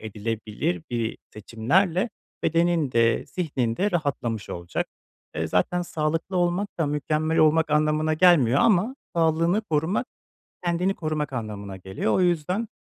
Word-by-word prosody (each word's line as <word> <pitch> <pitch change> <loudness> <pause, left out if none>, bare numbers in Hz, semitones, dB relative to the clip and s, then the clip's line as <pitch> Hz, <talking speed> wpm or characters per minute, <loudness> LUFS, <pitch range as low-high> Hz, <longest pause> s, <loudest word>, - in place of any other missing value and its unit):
edilebilir 105 -5 -3
bir 115 -2 -2
seçimlerle 165 - +1 0.3
bedenin 165 -4 +2
de, 115 0 +3
zihnin 130 -10 -2
de 205 +2 +1
rahatlamış 130 - -2
olacak. 85 0 -3 0.5
Eee, 80 +1 -1
zaten 175 - +1
sağlıklı 165 +3 -2
olmak 175 +3 +1
da 160 - +1
mükemmel 155 +2 0
olmak 155 0 +4
anlamına 155 +1 +2
gelmiyor 155 -7 +5
ama 220 +3 +3 0.2
sağlığını 165 +4 +2
korumak 165 +7 0 0.6
kendini 180 +3 +1
korumak 155 -3 -3
anlamına 105 -5 -5
geliyor. 95 +3 -2
O - - +2
yüzden, 180 +5 0
155 Hz, 125 wpm, -25 LUFS, 115-175 Hz, 0.6 s, gelmiyor